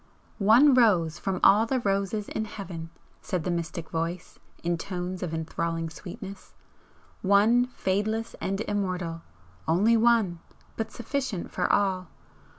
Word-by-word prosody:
"One 235 Hz, +8 st, +6 dB
rose 180 Hz, -10 st, +3 dB
from 190 Hz, -1 st, -2 dB
all 215 Hz, +3 st, +6 dB
the 260 Hz, +2 st, +1 dB
roses 200 Hz, -1 st, -1 dB
in 220 Hz, -, -3 dB
Heaven!" 185 Hz, -6 st, -7 dB, 0.3 s
said 180 Hz, -4 st, -2 dB
the 180 Hz, -, -1 dB
mystic 170 Hz, -1 st, -4 dB
Voice, 165 Hz, +2 st, -4 dB, 0.2 s
in 170 Hz, 0 st, +1 dB
tones 180 Hz, +1 st, -4 dB
of 175 Hz, -, -3 dB
enthralling 165 Hz, 0 st, -2 dB
sweetness 190 Hz, +3 st, -9 dB, 0.7 s
"One 215 Hz, +5 st, +4 dB
fadeless 220 Hz, 0 st, -1 dB
and 195 Hz, +2 st, -1 dB
immortal! 185 Hz, -6 st, -2 dB, 0.5 s
only 200 Hz, +8 st, +4 dB
one, 225 Hz, -6 st, +3 dB, 0.4 s
but 225 Hz, -1 st, -3 dB
sufficient 245 Hz, -5 st, -3 dB
for -, -, 0 dB
all! 190 Hz, -3 st, +1 dB
195 Hz, 130 wpm, -27 LUFS, 170-220 Hz, 0.7 s, One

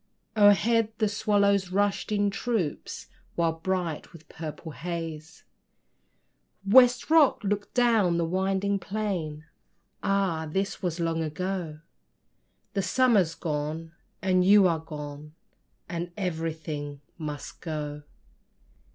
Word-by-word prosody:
O'erhead 215 Hz, +2 st, +4 dB
the 215 Hz, -, +2 dB
swallows 200 Hz, -2 st, +2 dB
rushed 200 Hz, +2 st, 0 dB
in 205 Hz, -1 st, +2 dB
troops, 200 Hz, -7 st, -3 dB, 0.3 s
While 165 Hz, -1 st, +2 dB
bright 180 Hz, -3 st, -2 dB
with 160 Hz, -2 st, -15 dB
purple 160 Hz, 0 st, -7 dB
haze, 160 Hz, -1 st, -6 dB, 1.2 s
West 245 Hz, +7 st, +5 dB
Rock 315 Hz, -8 st, +5 dB
looked 205 Hz, 0 st, -2 dB
down 225 Hz, -8 st, +3 dB
the 170 Hz, -, +1 dB
winding 190 Hz, +3 st, 0 dB
plain 175 Hz, -7 st, -3 dB, 0.6 s
Ah! 190 Hz, -5 st, 0 dB
this 195 Hz, +4 st, -2 dB
was 175 Hz, -2 st, -2 dB
long 165 Hz, -1 st, 0 dB
ago; 160 Hz, 0 st, -3 dB, 0.9 s
The 200 Hz, -, +1 dB
summer's 195 Hz, -4 st, +3 dB
gone, 155 Hz, +1 st, -3 dB, 0.3 s
and 185 Hz, -1 st, +3 dB
you 200 Hz, +1 st, +7 dB
are 165 Hz, -2 st, +1 dB
gone, 150 Hz, -1 st, -8 dB, 0.5 s
As 170 Hz, 0 st, -3 dB
everything 160 Hz, -5 st, -4 dB, 0.2 s
must 150 Hz, -2 st, -6 dB
go. 150 Hz, -3 st, -4 dB
180 Hz, 110 wpm, -27 LUFS, 160-200 Hz, 1.2 s, you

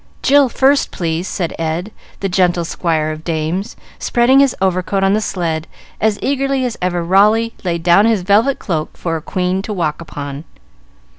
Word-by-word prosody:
"Jill 280 Hz, -1 st, +5 dB
first, 275 Hz, +3 st, +2 dB
please, 170 Hz, +1 st, -3 dB
sir," 190 Hz, -, -3 dB
said -, -, -9 dB
Ed, 165 Hz, +5 st, -2 dB, 0.3 s
the 195 Hz, -, 0 dB
gentle 180 Hz, -2 st, +1 dB
squire 160 Hz, -2 st, -1 dB
of 155 Hz, 0 st, -7 dB
dames, 165 Hz, +5 st, -2 dB, 0.2 s
spreading 245 Hz, +3 st, +3 dB
his 275 Hz, -3 st, +3 dB
overcoat 190 Hz, +1 st, 0 dB
on 195 Hz, 0 st, +3 dB
the 215 Hz, -, +1 dB
sled 165 Hz, -5 st, -2 dB, 0.3 s
as 215 Hz, -1 st, +2 dB
eagerly 275 Hz, -1 st, 0 dB
as 240 Hz, -2 st, -3 dB
ever 175 Hz, -1 st, -1 dB
Raleigh 210 Hz, +6 st, +3 dB
laid 170 Hz, -3 st, -2 dB
down 180 Hz, +5 st, +5 dB
his 220 Hz, -5 st, +1 dB
velvet 215 Hz, +8 st, +3 dB
cloak 160 Hz, -5 st, -4 dB
for 165 Hz, -2 st, -2 dB
a 160 Hz, -, -4 dB
queen 185 Hz, +3 st, -1 dB
to 205 Hz, -, -6 dB
walk 165 Hz, -5 st, -2 dB
upon. 145 Hz, -2 st, -7 dB
185 Hz, 175 wpm, -17 LUFS, 165-220 Hz, 0.3 s, Jill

